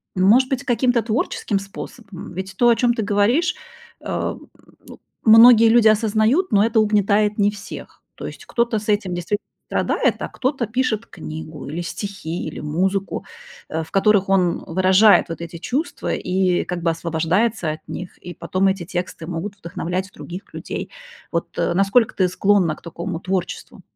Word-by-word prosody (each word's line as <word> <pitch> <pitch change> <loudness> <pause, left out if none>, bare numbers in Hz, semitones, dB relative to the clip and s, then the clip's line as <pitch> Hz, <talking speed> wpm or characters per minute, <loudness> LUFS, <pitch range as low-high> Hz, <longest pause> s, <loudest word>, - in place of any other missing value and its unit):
может 215 +8 +4
быть, 265 -1 -2
каким-то 245 -2 +2
творческим 220 -2 -1
способом? 195 0 -9
Ведь 190 +2 -6
то, 240 +2 +5
о 235 - +5
чём 240 0 +2
ты 230 - -2
говоришь, 225 - +2 0.5
эм, - - -4 0.4
ну - - -13 0.3
многие 225 +1 +8
люди 230 -1 +5
осознают, 220 - +2
но 200 0 +4
это 225 0 +2
угнетает 210 0 +2
не 205 0 +4
всех. 205 -1 -10
То - - -7
есть - - -10
кто-то 235 -1 0
с 215 - -11
этим 200 -4 0
действит 175 +4 -2 0.3
страдает, - - +1
а - - -4
кто-то 265 -1 -1
пишет 230 -1 -1
книгу, 155 -3 -8
или 165 +4 -4
стихи, 180 -2 -5
или 155 - -7
музыку, 190 +6 -1 0.5
э, 160 +1 -2
в 160 - -15
которых 195 0 +3
он 185 -3 +1
выражает 190 +3 +4
вот 165 - -6
эти 170 0 -7
чувства 270 - -3
и 180 -1 0
как 180 -1 -4
бы 170 - +1
освобождается 170 +5 0
от 155 - -9
них, 180 - -7
и 175 - -9
потом 185 +3 0
эти 190 -2 0
тексты 175 -2 -5
могут 180 +4 -4
вдохновлять 180 +1 -4
других 180 +4 -9
людей. - - -5 0.4
Вот, 170 -1 -2
э, 175 - +1
насколько 200 +5 +3
ты 185 - +2
склонна 185 -4 +2
к - - -19
такому 170 +1 -5
творчеству? 185 0 -4
195 Hz, 165 wpm, -21 LUFS, 175-220 Hz, 0.5 s, многие